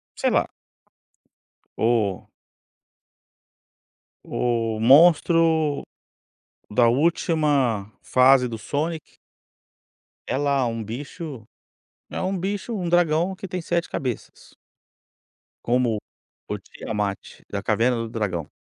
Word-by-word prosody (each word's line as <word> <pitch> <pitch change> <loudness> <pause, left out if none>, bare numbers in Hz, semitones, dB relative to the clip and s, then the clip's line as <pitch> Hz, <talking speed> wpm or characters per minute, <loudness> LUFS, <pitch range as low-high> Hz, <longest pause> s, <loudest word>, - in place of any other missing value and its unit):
Sei - - +1
lá. - - +2 1.3
O 110 -5 0 2.0
o 115 -2 -1
monstro 160 +3 +5 0.9
da 120 - +4
última 140 - +1
fase 130 0 +4
do 115 -2 -4
Sonic 155 +8 -2 1.3
é - - -1
lá 140 -2 +1
um 115 -1 -3
bicho, 130 +2 -7 0.6
é - - -5
um 190 +1 -1
bicho, 200 +5 -3
um 180 -4 -2
dragão 175 +1 +2
que 195 - -8
tem 180 0 -4
7 170 0 -1
cabeças. 125 -5 -5 1.1
Como 120 -2 +1 0.5
o - - -3
Tiamat 105 -3 -4 0.3
da - - -3
Caverna 125 +2 +2
do 115 0 -3
Dragão. 95 - -3
135 Hz, 95 wpm, -23 LUFS, 115-165 Hz, 2.0 s, monstro